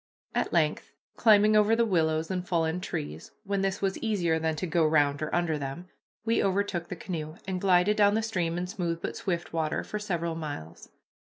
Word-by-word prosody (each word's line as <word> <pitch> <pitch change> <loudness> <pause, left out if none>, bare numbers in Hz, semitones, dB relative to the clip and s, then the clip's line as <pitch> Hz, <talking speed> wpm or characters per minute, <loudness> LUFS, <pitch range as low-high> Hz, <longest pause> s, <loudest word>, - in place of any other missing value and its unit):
At - - 0
length, - - 0 0.2
climbing 215 -1 +5
over 215 +1 +5
the 235 0 +3
willows 160 -4 +1
and 180 -1 -1
fallen 165 0 0
trees, 165 -5 -5
when 200 -1 -1
this 195 0 -1
was 195 -1 0
easier 180 -8 +1
than 160 0 0
to 170 - -3
go 170 -1 +2
round 145 -2 +3
or 155 - -2
under 170 -3 0
them, 145 +6 -6 0.4
we 230 0 +2
overtook 195 -3 0
the - - -4
canoe, 160 -3 -5
and 185 -1 -2
glided 190 +2 +4
down 205 0 +5
the 220 - +1
stream 175 -6 -1
in 175 - -1
smooth 175 -3 -3
but - - -4
swift 175 -4 -3
water 160 -2 -1
for 210 - -5
several 170 -5 -2
miles. 145 - -7
175 Hz, 200 wpm, -28 LUFS, 160-200 Hz, 0.4 s, climbing